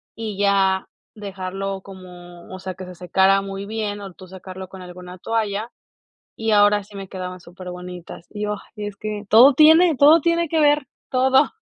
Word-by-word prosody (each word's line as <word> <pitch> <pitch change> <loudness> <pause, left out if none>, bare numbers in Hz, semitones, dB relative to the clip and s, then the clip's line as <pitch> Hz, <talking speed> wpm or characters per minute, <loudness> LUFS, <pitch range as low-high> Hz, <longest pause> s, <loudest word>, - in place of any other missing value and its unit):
y 220 -3 -6
ya 195 -1 +1 0.3
dejarlo 195 -1 -5
como, 180 -2 -13
o 185 - -7
sea, 185 0 -6
que 185 +1 -10
se 180 0 -11
secara 190 +2 +2
muy 195 0 -6
bien 210 -1 -4
o 195 -1 -8
tú 185 +1 -14
secarlo 190 0 -9
con 190 0 -12
alguna 180 0 -11
toalla, 220 +1 -2 0.7
y 225 0 -1
ahora 205 0 +4
sí 205 +1 -17
me 195 -1 -8
quedaban 185 -1 -7
superbonitas. 180 -1 -10
Y 210 0 -6
yo: 210 0 -1 0.2
"Es 205 -1 -5
que, 210 0 -6
todo 245 +6 +8
tiene 320 +4 +6
todo 305 +4 +6
tiene 335 +1 +1
que 320 +1 0
ver, 295 -2 +3 0.2
todo". 265 +2 +3
195 Hz, 175 wpm, -21 LUFS, 185-220 Hz, 0.7 s, todo